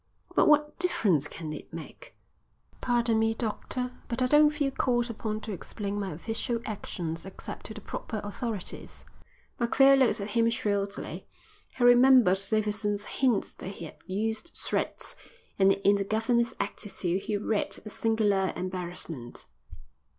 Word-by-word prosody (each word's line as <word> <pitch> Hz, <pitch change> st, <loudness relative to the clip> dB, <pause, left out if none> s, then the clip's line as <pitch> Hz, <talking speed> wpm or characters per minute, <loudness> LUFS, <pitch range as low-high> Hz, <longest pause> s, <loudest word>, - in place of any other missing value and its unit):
"But -, -, +5 dB
what 300 Hz, +1 st, +3 dB
difference 195 Hz, -, +2 dB
can 155 Hz, -1 st, -6 dB
it 150 Hz, -, -9 dB
make?" 165 Hz, -, -10 dB, 0.7 s
"Pardon 235 Hz, -2 st, +2 dB
me, 225 Hz, 0 st, +2 dB
doctor, 250 Hz, +2 st, -3 dB, 0.2 s
but 235 Hz, 0 st, -3 dB
I -, -, +4 dB
don't 295 Hz, +3 st, +6 dB
feel 295 Hz, -2 st, -1 dB
called 240 Hz, -2 st, +1 dB
upon 215 Hz, -1 st, -4 dB
to 215 Hz, -, -6 dB
explain 200 Hz, +2 st, -4 dB
my 195 Hz, -2 st, -3 dB
official 225 Hz, +8 st, -3 dB
actions 170 Hz, -6 st, -4 dB
except 195 Hz, -, -8 dB
to 220 Hz, -, -8 dB
the 215 Hz, -, -8 dB
proper 215 Hz, +2 st, -5 dB
authorities." 205 Hz, -1 st, -6 dB, 0.5 s
Macphail 270 Hz, +3 st, +6 dB
looked 260 Hz, -4 st, +3 dB
at 200 Hz, +1 st, -4 dB
him 230 Hz, 0 st, +3 dB
shrewdly. 200 Hz, -3 st, -2 dB, 0.5 s
He 250 Hz, -, 0 dB
remembered 245 Hz, -5 st, +7 dB
Davidson's 210 Hz, -1 st, 0 dB
hint 250 Hz, -6 st, +1 dB
that -, -, -6 dB
he 190 Hz, -3 st, -6 dB
had 155 Hz, -, -10 dB
used 220 Hz, -, -2 dB
threats, -, -, -1 dB, 0.4 s
and 195 Hz, 0 st, +6 dB
in 200 Hz, +1 st, +3 dB
the 200 Hz, -, 0 dB
governor's 230 Hz, +3 st, +1 dB
attitude 190 Hz, -3 st, -2 dB
he 210 Hz, 0 st, -1 dB
read 210 Hz, +1 st, -1 dB
a 215 Hz, -, -7 dB
singular 210 Hz, -4 st, +1 dB
embarrassment. 175 Hz, -8 st, -6 dB
215 Hz, 145 wpm, -28 LUFS, 195-240 Hz, 0.7 s, remembered